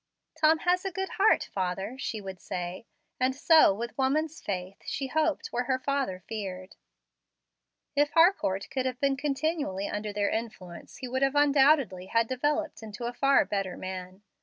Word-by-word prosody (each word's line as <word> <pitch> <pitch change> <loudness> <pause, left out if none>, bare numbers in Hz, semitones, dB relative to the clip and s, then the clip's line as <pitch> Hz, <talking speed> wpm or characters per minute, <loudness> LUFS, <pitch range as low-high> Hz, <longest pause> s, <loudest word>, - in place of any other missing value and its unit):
"Tom 315 +1 +4
has 360 +1 +2
a 385 - -1
good 385 +2 -3
heart, 420 +3 +4
father," 190 +4 -2
she 225 -5 -3
would 190 -2 -8
say; 180 +4 -5 0.3
and 260 +1 +1
so, 315 -3 +6
with 230 +4 -5
woman's 305 +4 0
faith, 185 -1 -4
she 275 - -3
hoped 315 +3 0
where 245 +1 -1
her 260 +1 +1
father 260 -9 -2
feared. 190 -4 -6 1.2
If 290 +1 +3
Harcourt 325 - +3
could 260 -1 -1
have 255 -1 -4
been 275 0 +2
continually 280 - -1
under 210 0 -3
their 205 0 0
influence 210 -6 -6
he 255 - -6
would 260 +2 -2
undoubtedly 275 -8 +3
have 230 +1 +2
developed 295 +4 -1
into 220 +2 -7
a 240 - -3
far 275 +2 +4
better 195 -3 -3
man. 185 +1 -7
250 Hz, 160 wpm, -28 LUFS, 195-290 Hz, 1.2 s, so